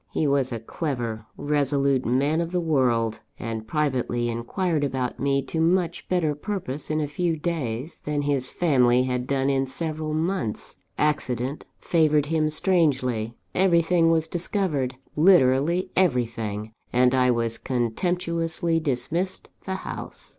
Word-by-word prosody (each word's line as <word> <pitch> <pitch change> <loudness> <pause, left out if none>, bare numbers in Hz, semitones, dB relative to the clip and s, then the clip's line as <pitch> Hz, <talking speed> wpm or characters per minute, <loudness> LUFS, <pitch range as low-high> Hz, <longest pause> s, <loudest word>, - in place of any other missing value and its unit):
He 155 - 0
was 140 -2 +1
a 115 - -3
clever, 115 -4 -4
resolute 140 -3 +1
man 140 +7 +2
of 170 0 -3
the 180 - +1
world, 125 -9 +1 0.2
and 110 -1 -5
privately 125 -4 0
inquired 150 - -1
about 130 -3 -2
me 140 0 +1
to 160 +4 -2
much 170 0 +1
better 170 -5 +1
purpose 150 -4 -4
in 155 0 0
a 150 - 0
few 165 +3 -1
days, 150 -4 -3
than 150 -1 -1
his 140 -3 0
family 125 -7 +3
had 125 -1 -2
done 135 -1 +1
in 135 -1 +1
several 155 +1 -3
months. 160 - -2 0.2
Accident 135 -2 -1
favoured 155 -3 +2
him 155 0 +1
strangely, 135 - +1 0.2
everything 170 -2 +3
was 165 -1 +2
discovered 165 -7 -1 0.2
literally 170 +2 +4
everything 115 - 0 0.2
and 125 +1 +4
I 130 -1 +3
was 115 -1 0
contemptuously 165 +6 0
dismissed 160 +6 -2
the 190 - -2
house. - - -7
145 Hz, 135 wpm, -25 LUFS, 125-165 Hz, 0.2 s, literally